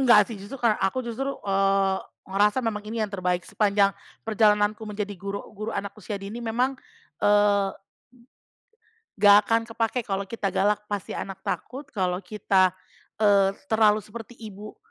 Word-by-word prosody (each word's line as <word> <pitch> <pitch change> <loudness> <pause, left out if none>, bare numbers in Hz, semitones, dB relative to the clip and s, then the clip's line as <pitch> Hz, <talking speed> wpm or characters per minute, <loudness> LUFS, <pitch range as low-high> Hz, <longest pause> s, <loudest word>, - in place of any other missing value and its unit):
Enggak 240 -5 +6
sih 225 - -5
justru 200 +7 -8
kar 235 -3 +3
aku 195 +7 +1
justru, 270 +4 -3
eee, 195 -1 +2 0.3
ngerasa 205 +4 +2
memang 215 -2 -1
ini 225 0 -1
yang 210 - -6
terbaik 180 -2 -1
sepanjang 200 -1 +2 0.3
perjalananku 210 -1 +3
menjadi 210 -1 -4
guru 200 +2 -5
guru 215 +2 -4
anak 200 0 -3
usia 205 +1 -5
dini 205 +4 -6
memang, 245 +3 -1 0.4
eee 205 -1 +4 1.5
Nggak 205 0 +7
akan 225 0 +3
kepake 225 +1 -1
kalau 195 0 -2
kita 210 -3 -2
galak 210 +1 +1
pasti 205 -2 -4
anak 195 -1 -6
takut 265 +7 -5
kalau 185 -3 -1
kita, 190 -1 +2 0.4
eee, 200 -2 +4 0.2
terlalu 215 -1 +4
seperti 230 +2 -10
ibu, 210 -1 -10
210 Hz, 150 wpm, -25 LUFS, 195-225 Hz, 1.5 s, Nggak